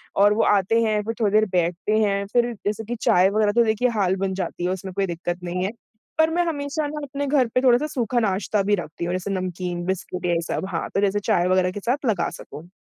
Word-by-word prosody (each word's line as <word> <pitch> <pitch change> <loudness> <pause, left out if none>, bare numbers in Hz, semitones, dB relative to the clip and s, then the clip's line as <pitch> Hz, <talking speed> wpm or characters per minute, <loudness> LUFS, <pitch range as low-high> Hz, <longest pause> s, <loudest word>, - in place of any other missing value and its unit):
और 205 +1 +5
वो 220 - +2
आते 205 +3 +3
हैं, 215 -1 +1
फिर 225 +2 -3
थोड़ी 210 -2 +2
देर 215 0 +5
बैठते 180 +4 0
हैं 200 -2 +1
फिर 240 0 +2
जैसे 210 +2 -1
कि 240 +3 -3
चाय 180 +2 +4
वग़ैरह 210 0 +2
तो 235 +3 +4
देखिए 220 +3 +2
हाल 190 -1 +2
बन 190 - -2
जाती 185 -2 -4
है, - - +1
उसमें 190 0 -5
कोई 195 +1 0
दिक्कत 175 +1 -4
नहीं 180 +1 -2
है। 195 - -2 0.5
पर 320 0 +4
मैं 350 +1 +2
हमेशा 295 -1 -2
ना 300 +1 -5
अपने 285 0 -4
घर 270 -3 +3
पे 255 - +4
थोड़ा-सा 255 +3 +4
सूखा 245 -4 -1
नाश्ता 205 -1 0
भी 205 +1 +2
रखती 170 -2 -5
हूँ 175 - -2
जैसे 185 +2 -3
नमकीन, 180 -2 -3
बिस्कुट 180 -1 -3
ये 170 -1 +2
सब। - - -2
हाँ, 170 -3 -3
तो 195 - +1
जैसे 205 0 +1
चाय 205 -4 +1
वग़ैरह 185 0 +2
के 205 - -6
साथ 250 +7 -1
लगा 220 -5 +1
सकूँ। 150 +4 -11
200 Hz, 245 wpm, -23 LUFS, 185-235 Hz, 0.5 s, और